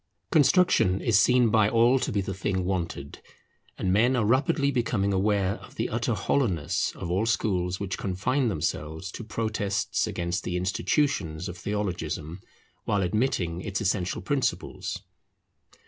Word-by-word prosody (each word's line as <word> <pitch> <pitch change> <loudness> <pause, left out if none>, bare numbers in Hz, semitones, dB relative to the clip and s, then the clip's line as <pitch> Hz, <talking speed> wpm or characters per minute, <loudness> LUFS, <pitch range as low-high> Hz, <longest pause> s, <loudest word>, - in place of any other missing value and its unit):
Construction 140 - +4
is 110 -4 +3
seen 125 +1 +4
by 110 -2 +4
all 120 +3 +4
to - - -2
be 100 - 0
the 95 0 -4
thing 95 -1 -2
wanted: 85 -6 -3 0.6
and 90 - 0
men 120 +6 +4
are 115 -4 +1
rapidly 140 +5 +2
becoming 110 -6 0
aware 100 0 +1
of - - -15
the - - -2
utter - - 0
hollowness 95 - 0
of 85 - -5
all 100 +5 +1
schools 90 -5 0
which 95 -2 -4
confine 110 +8 0
themselves 80 -2 -3
to 120 - -7
protests 110 -3 -1
against 85 0 -2
the 90 - -2
institutions 95 - 0
of 90 - -6
theologism, 90 -4 -3 0.4
while 100 -1 +1
admitting 90 -4 0
its 100 0 -3
essential 95 -4 -1
principles. 145 -3 -2
100 Hz, 145 wpm, -27 LUFS, 90-115 Hz, 0.6 s, Construction